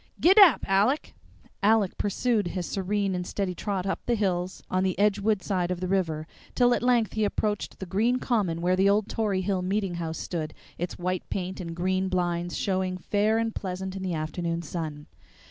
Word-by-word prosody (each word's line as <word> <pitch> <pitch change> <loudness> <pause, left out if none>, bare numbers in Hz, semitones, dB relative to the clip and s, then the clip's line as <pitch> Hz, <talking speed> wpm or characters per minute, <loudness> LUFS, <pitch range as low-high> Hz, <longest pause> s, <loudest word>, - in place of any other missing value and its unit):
Git 375 +5 +5
dap, 375 - +8
Aleck!" 205 +10 +2 0.5
Aleck 210 -2 +3
pursued 210 0 0
his 180 0 -3
serene 195 +1 -1
and 180 0 -2
steady 195 -3 -2
trot 195 0 -3
up 195 - -1
the 240 - +3
hills 185 -3 -1
on 185 - 0
the 185 -2 0
Edgewood 205 0 +2
side 180 -3 0
of 180 -1 -2
the 185 - -2
river, 165 -5 0 0.3
till 245 -1 +4
at - - 0
length 240 -4 +2
he 220 - 0
approached 210 0 -1
the 190 - -6
green 220 +7 +1
Common 200 -10 0
where 180 +1 +2
the 190 +2 +4
old 205 +1 +2
Tory 205 -4 0
Hill 190 -1 0
meeting 195 0 -1
house 160 -1 -3
stood, 155 -3 -4 0.2
its 175 +1 -3
white 185 0 -3
paint 185 0 -3
and 170 -2 -5
green 185 +2 0
blinds 175 -1 -1
showing 185 -1 -1
fair 210 +4 +1
and 225 -1 0
pleasant 190 0 -4
in 190 - -5
the 185 -3 -2
afternoon 170 +2 -3
sun. 155 -2 -5
190 Hz, 195 wpm, -27 LUFS, 180-210 Hz, 0.5 s, dap